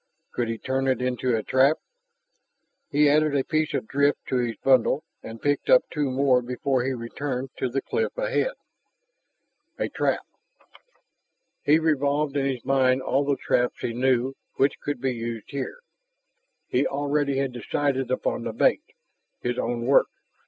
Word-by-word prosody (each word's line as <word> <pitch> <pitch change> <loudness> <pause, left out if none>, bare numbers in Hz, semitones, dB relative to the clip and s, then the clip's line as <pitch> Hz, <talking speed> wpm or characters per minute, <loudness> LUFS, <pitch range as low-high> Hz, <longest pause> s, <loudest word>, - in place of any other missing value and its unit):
Could 120 - -1
he 115 0 -3
turn 135 +3 -1
it 130 -2 +2
into 125 -1 0
a 110 - -3
trap? 135 +7 +3 1.1
He 150 +1 +4
added 150 0 +3
a 135 - +2
piece 155 +1 0
of - - -2
drift 140 +1 +1
to 130 - +1
his 120 -2 -1
bundle 130 +4 +3 0.2
and 115 0 -9
picked 145 +2 0
up - - +7
two 150 -3 -1
more 130 -1 +3
before 125 +1 -1
he 135 - -1
returned 130 +2 -4
to 130 - -1
the 135 +3 -2
cliff 460 +2 -2
ahead. - - 0 1.2
A - - -1
trap.... - - -1 1.4
He 150 +2 +5
revolved 145 -2 +1
in 135 -1 +1
his 130 -3 -3
mind 130 -1 +3
all 140 +2 +1
the 140 -1 +1
traps 125 0 0
he 115 - -2
knew 130 +1 +1 0.2
which 135 - +2
could 145 -4 -4
be 130 -1 0
used 115 0 -5
here. 145 - -5 0.9
He 130 - +1
already 140 0 0
had 135 -1 0
decided 130 +2 -1
upon 130 - -1
the - - -4
bait - - +3 0.6
his 120 0 -2
own 120 0 -2
work. 135 +2 +5
135 Hz, 160 wpm, -25 LUFS, 125-145 Hz, 1.4 s, up